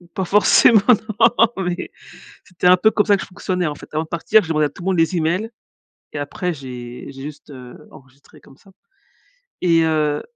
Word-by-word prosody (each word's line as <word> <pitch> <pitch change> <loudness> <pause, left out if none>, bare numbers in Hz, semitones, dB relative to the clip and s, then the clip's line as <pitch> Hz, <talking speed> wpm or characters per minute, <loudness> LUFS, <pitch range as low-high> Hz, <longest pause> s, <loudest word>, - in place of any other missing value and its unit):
Pas 190 - -2
forcément, 210 +3 +5 0.4
non, 230 -1 +4
mais 175 0 -4 0.5
c'était 180 0 -2
un 180 - +6
peu 220 +4 +3
comme 210 - 0
ça 205 -2 +3
que - - -7
je - - -11
fonctionnais, 185 -1 -3
en 150 - -4
fait. - - -15
Avant 155 +1 -1
de - - -21
partir 175 +7 +2
j'ai - - -9
demandé 155 -2 +1
à - - -12
tout 145 - -15
le - - -8
monde 190 -2 0
les 165 +3 +1
emails 180 +8 -1 0.6
et - - -5
après 170 +5 -4
j'ai 125 -3 -9
j'ai 135 0 -11
juste, 150 +1 -10
heu, 125 -3 -12
enregistré 130 +1 -19
comme 135 - -20
ça. 195 - -22 0.9
Et 165 -2 +3
heu 155 -2 0
165 Hz, 210 wpm, -19 LUFS, 145-185 Hz, 0.9 s, un